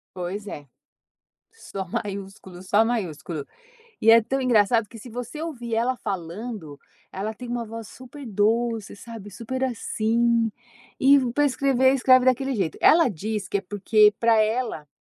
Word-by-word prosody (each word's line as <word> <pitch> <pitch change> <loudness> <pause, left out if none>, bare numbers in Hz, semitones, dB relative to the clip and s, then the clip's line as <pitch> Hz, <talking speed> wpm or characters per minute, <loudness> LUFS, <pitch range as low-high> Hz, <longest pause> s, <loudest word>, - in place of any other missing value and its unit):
Pois 185 +3 -5
é. 145 -7 -8 0.9
Só 195 - -7
maiúsculo, 195 -2 -6
só 200 +4 +3
maiúsculo. 175 -9 -3 0.6
E 225 - +5
é 230 0 +7
tão 270 +5 -2
engraçado 230 -2 +3
que 230 - -12
se 230 - -11
você 245 +6 -6
ouvir 240 -8 -4
ela 245 +3 +1
falando, 180 -4 -6 0.3
ela 210 +3 -4
tem 245 +2 -9
uma 240 -1 -2
voz 225 -1 -8
super 260 +2 -11
doce, 225 +1 0
sabe, 220 -1 -10
super 260 +5 -3
assim 230 -1 +1 0.5
E 280 +2 +7
pra 290 +3 +2
escrever, 265 -1 +3
escreve 255 -1 +5
daquele 265 +1 +2
jeito. 190 -7 -2
Ela 330 -3 +6
diz 210 +1 -4
que 200 - 0
é - - -4
porque 210 +2 +3
pra 230 -1 +4
ela, 220 -8 -1
225 Hz, 150 wpm, -24 LUFS, 200-250 Hz, 0.9 s, é